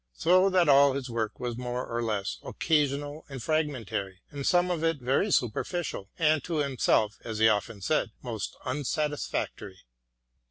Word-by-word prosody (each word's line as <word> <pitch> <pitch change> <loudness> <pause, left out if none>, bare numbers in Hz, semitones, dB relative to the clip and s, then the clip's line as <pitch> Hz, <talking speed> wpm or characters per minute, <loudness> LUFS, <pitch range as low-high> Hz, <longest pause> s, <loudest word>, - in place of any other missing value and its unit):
So 185 +3 +4
that 185 -3 +3
all 140 -1 +6
his 130 -2 -4
work 110 -2 -2
was 120 -1 -4
more 125 0 -3
or 115 0 -3
less 105 -4 -2
occasional 145 -1 0
and 135 -2 -6
fragmentary, 120 - -2
and 140 -1 -4
some 180 0 +3
of 165 -2 -2
it 165 -1 +2
very 135 - +1
superficial, 125 - -1
and 155 -3 +3
to 170 - -3
himself, 125 -7 +1
as 110 -2 -5
he 110 +1 +5
often 105 0 0
said, 150 +4 +1
most 115 -5 -4
unsatisfactory. 145 - -2
135 Hz, 155 wpm, -28 LUFS, 115-155 Hz, -, all